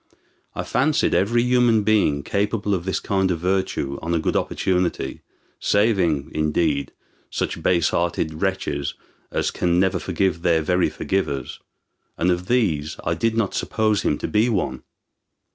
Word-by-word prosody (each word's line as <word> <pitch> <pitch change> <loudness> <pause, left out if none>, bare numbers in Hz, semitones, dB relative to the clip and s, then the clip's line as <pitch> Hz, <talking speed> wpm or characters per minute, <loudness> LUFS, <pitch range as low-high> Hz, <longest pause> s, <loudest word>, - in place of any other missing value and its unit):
I - - -2
fancied 150 +3 +1
every 120 +5 +2
human 120 -3 +3
being 100 -10 +2
capable 105 0 -1
of 90 -2 -2
this 95 - -1
kind 95 -1 0
of 90 - 0
virtue 90 -6 -1
on 85 +1 -1
a - - +1
good - - -1
opportunity, 90 -7 -1 0.4
saving, 95 -9 +1
indeed, 75 -2 0 0.4
such - - -3
base 85 -3 +2
hearted 80 -2 -1
wretches 80 -7 -1 0.4
as - - 0
can 90 0 +1
never 95 0 +2
forgive 95 -4 -1
their 85 -2 +2
very 90 +3 +2
forgivers; 75 -9 -2 0.6
and 90 +2 +2
of 90 +1 -2
these 90 -12 0
I - - +1
did 115 0 0
not 110 -4 0
suppose 110 -2 0
him - - 0
to - - -3
be 110 +3 +2
one. 100 -6 -1
90 Hz, 150 wpm, -22 LUFS, 80-105 Hz, 0.6 s, human